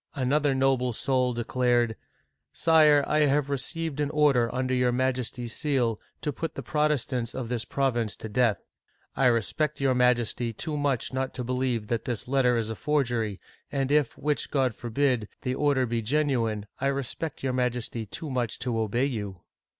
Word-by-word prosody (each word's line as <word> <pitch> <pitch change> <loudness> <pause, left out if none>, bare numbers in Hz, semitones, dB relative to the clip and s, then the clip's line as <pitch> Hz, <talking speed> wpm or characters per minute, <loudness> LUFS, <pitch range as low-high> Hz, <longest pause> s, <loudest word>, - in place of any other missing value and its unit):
'* - - -27
Another 145 +1 +2
noble 130 -2 +2
soul 130 +1 +1
declared: 120 -1 +1 0.3
" - - -53
Sire, 155 -3 +5
I 155 - +2
have 145 -1 +2
received 155 +2 -3
an 145 -1 +1
order 145 -6 +3
under 130 0 -1
your 125 -1 +2
Majesty's 125 -2 -2
seal, 125 -7 0 0.2
to 150 - -2
put 165 - -4
the - - -5
Protestants 145 -6 0
of 125 -3 -4
this 120 -2 -2
province 120 -6 0
to - - -7
death. 115 0 +1 0.5
I 135 - +4
respect 125 +6 0
your 135 -1 +2
Majesty 120 -2 +2
too 155 +6 -3
much 140 -4 0
not 130 0 -2
to 125 - -3
believe 125 -2 -1
that 115 -2 -1
this 120 -3 -3
letter 125 -2 +3
is 110 -1 -1
a - - -4
forgery, 120 -8 0 0.3
and 135 -1 -1
if, 150 -4 +2
which 150 +1 -1
God 130 -4 +1
forbid, 120 -1 0 0.2
the 125 - -1
order 140 -1 +2
be 115 -1 -1
genuine, 115 -5 0
I 140 - 0
respect 140 +3 -3
your 130 -1 0
Majesty 120 -3 -2
too 150 +8 -6
much 120 -3 -1
to 120 -3 -2
obey 110 +4 +1
you." 105 -9 -4
130 Hz, 175 wpm, -27 LUFS, 120-140 Hz, 0.5 s, Sire